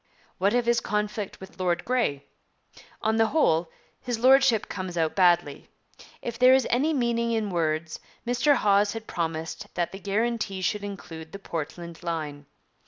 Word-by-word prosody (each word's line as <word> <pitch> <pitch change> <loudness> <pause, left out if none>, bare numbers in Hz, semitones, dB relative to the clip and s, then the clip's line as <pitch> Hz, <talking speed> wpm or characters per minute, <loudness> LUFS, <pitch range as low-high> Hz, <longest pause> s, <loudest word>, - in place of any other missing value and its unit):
What 200 +5 +2
of 245 -1 +2
his 235 0 +2
conflict 210 -1 -3
with 190 0 -12
Lord 175 -1 0
Grey? 230 - 0 0.8
On 220 +1 +2
the 225 0 +4
whole, 170 - +2 0.3
his 245 -2 -2
Lordship 260 -2 +5
comes 185 -2 -5
out 160 -1 +1
badly. 175 -6 +2 0.5
If 235 0 -5
there 255 +1 +7
is 265 - +2
any 275 +6 +2
meaning 235 -4 0
in 215 -3 -1
words, 160 -1 -1 0.3
Mr 245 +4 +3
Hawes 205 -3 +3
had 225 -1 -6
promised 165 +3 -4
that 175 -1 -1
the 195 - -8
guarantee 205 -1 -1
should 205 +2 0
include 165 -5 -8
the - - -5
Portland 170 -2 -6
line. 155 -4 -4
200 Hz, 160 wpm, -26 LUFS, 170-235 Hz, 0.8 s, there